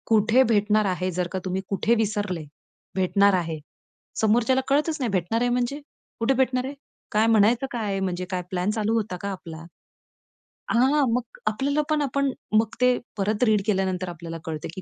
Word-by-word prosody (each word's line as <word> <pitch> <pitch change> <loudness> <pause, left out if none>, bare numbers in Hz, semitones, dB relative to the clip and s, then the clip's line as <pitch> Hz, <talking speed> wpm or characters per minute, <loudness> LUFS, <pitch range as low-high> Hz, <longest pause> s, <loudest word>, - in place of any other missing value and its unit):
कुठे 225 +3 +4
भेटणार 215 -2 +2
आहे? 185 -1 -1
जर 180 0 -1
का 190 - -2
तुम्ही 185 +1 -1
कुठे? 215 +4 +2
विसरले, 205 -6 -1 0.5
भेटणार 200 +2 +3
आहे. 165 -4 -1 0.6
समोरच्याला 235 +4 +3
कळतच 300 +3 +1
नाही. 250 -4 -1
भेटणार 195 +5 0
आहे 245 - +2
म्हणजे? 245 +4 -1 0.4
कुठे 230 +4 +2
भेटणार 255 -1 +1
आहे? 270 - -5 0.4
काय 215 +1 +3
म्हणायचं 225 +4 +4
काय 235 -3 -3
आहे? 195 - -1
म्हणजे 185 -1 -2
काय 185 -1 -1
प्लॅन 180 +1 0
चालू 215 0 0
होता 215 -5 -1
का 200 - -3
आपला? 170 -4 -8 1.2
हां, 265 +5 +4
मग 250 - +2 0.3
आपल्याला 275 +8 +1
पण 305 -1 +2
आपण 280 0 0 0.3
मग 220 +1 +3
ते 250 0 +4 0.2
परत 210 +3 0
रीड 215 -4 +3
केल्यानंतर 190 -3 0
आपल्याला 170 -1 -7
कळते, 155 -2 -4
की 190 - -6
215 Hz, 175 wpm, -25 LUFS, 190-245 Hz, 1.2 s, कुठे